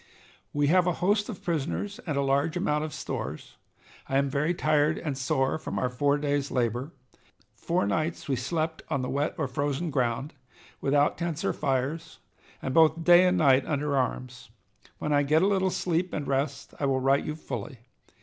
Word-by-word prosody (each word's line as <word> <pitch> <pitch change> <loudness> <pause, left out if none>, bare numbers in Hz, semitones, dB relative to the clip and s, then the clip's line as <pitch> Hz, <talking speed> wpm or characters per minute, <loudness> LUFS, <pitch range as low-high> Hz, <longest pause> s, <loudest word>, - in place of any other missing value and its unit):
"We 145 0 +1
have 180 +4 +4
a 180 - +2
host 205 +5 +1
of 200 -4 -7
prisoners 175 - -2
and 150 -3 -1
a 140 - +2
large 140 +5 +1
amount 150 -5 0
of 155 - -4
stores. 75 - -6 0.5
I 135 - +2
am 140 0 +1
very 150 +5 +1
tired 155 -1 +2
and 150 -4 -3
sore 135 +2 0
from - - -5
our 125 - 0
four 140 +3 +2
days' 145 -1 -1
labor. 125 +3 -1 0.6
Four - - -1
nights 155 +14 -2
we 135 - +1
slept 160 +5 -2
on 140 -4 -1
the 125 - -3
wet 145 +3 -1
or 155 - -1
frozen 145 +5 -2
ground, 130 +2 -1 0.5
without 145 +2 +2
tents 170 -2 -2
or - - +1
fires, 140 +3 -2 0.5
and 130 - -2
both 160 +1 +4
day 175 +2 +7
and 180 0 +2
night 135 -5 +5
under 145 -1 -1
arms. 125 -1 -3 0.5
When 150 - -1
I 145 - +4
get 155 +4 +3
a - - +4
little 190 -2 +2
sleep 175 0 -1
and 145 - -3
rest 140 +1 -2
I 140 - +1
will 135 -1 +1
write 135 +2 +2
you 150 - -3
fully. 155 -3 -6
145 Hz, 190 wpm, -27 LUFS, 135-165 Hz, 0.6 s, day